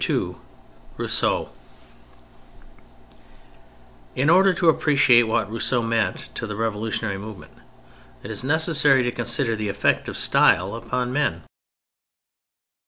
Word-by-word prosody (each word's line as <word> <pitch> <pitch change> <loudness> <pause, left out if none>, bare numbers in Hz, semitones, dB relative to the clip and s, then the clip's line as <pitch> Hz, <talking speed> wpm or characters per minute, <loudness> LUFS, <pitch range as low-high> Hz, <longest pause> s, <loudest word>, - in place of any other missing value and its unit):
II - - -1 0.6
ROUSSEAU - - 0 2.7
In 140 +5 +2
order 190 +2 +5
to 175 -1 -1
appreciate 135 -7 +4
what 110 -2 -1
Rousseau 115 +1 -1
meant 115 -1 -2
to 115 - -5
the 105 - -6
revolutionary 110 -2 -3
movement, 105 -1 -11 0.7
it 105 - -7
is 105 +1 -4
necessary 150 -2 +2
to 120 - -1
consider 120 0 -1
the 110 -1 -4
effect - - 0
of - - -6
style 95 +3 +2
upon 125 +2 -3
men. 130 - -1
115 Hz, 110 wpm, -22 LUFS, 110-140 Hz, 2.7 s, order